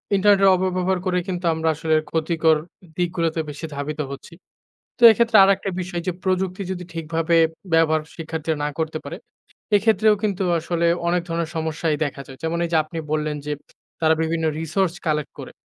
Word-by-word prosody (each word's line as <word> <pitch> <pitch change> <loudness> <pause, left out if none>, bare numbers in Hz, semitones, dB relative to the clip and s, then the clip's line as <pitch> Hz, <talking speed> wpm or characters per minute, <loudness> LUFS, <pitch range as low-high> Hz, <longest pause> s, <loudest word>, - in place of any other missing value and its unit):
ইন্টারনেটের 195 0 +5
অপব্যবহার 185 0 0
করে 180 -1 +1
কিন্তু 180 -1 -3
আমরা 160 0 0
আসলে 160 +1 0 0.2
ক্ষতিকর 160 0 +2 0.4
দিকগুলোতে 170 -2 -1
বেশি 150 +3 -6
ধাবিত 145 +2 -4
হচ্ছি। 140 - -9 0.6
তো 240 - -3
এক্ষেত্রে 230 0 +3
আরেকটা 195 0 +2
বিষয় 175 -1 -4
যে - - +2
প্রযুক্তি 185 0 -1
যদি 180 -1 -5
ঠিকভাবে 165 +1 0 0.4
ব্যবহার 160 -1 +4
শিক্ষার্থীরা 160 -1 -3
না - - 0
করতে 160 0 -1
পারে, - - -7 0.6
এক্ষেত্রেও 215 0 +4
কিন্তু 200 -3 0 0.2
আসলে 170 +1 -1 0.2
অনেক 175 +1 +2
ধরনের 165 -1 -2
সমস্যাই 160 -1 -1
দেখা 140 -1 -5
যায়। 135 - -11
যেমন 165 +1 -1
এই - - -5
যে - - +5
আপনি 155 +2 -9
বললেন 155 -1 -1
যে, 150 - -3 0.5
তারা 160 0 +4
বিভিন্ন 160 0 -1
রিসোর্স 170 +3 0
কালেক্ট 150 -2 -1
করে। - - -8
165 Hz, 165 wpm, -22 LUFS, 160-185 Hz, 0.6 s, ইন্টারনেটের